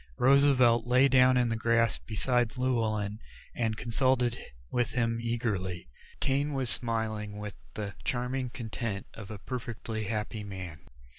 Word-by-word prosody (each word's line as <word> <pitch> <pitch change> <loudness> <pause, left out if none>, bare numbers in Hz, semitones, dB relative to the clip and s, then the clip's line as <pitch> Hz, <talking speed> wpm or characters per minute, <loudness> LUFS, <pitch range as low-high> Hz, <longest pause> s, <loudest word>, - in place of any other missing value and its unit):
Roosevelt 130 -3 +5
lay 130 +2 +5
down 130 -1 +5
in 120 -1 +3
the 115 - 0
grass 115 -1 +2
beside 120 +2 0
Llewellyn 110 -5 0 0.3
and 110 -2 -1
consulted 125 +1 +1 0.4
with 120 -1 0
him 115 -1 +1
eagerly. 100 - -2 0.3
Kane 140 +2 +1
was 130 -4 0
smiling 110 -3 -1
with 105 -1 -5 0.2
the 105 -2 -4
charming 125 +1 -1
content 110 -4 -4
of 105 -4 -9
a 110 - -6
perfectly 115 -1 -4
happy 105 0 -3
man. 95 -6 -7
115 Hz, 135 wpm, -30 LUFS, 105-125 Hz, 0.4 s, Roosevelt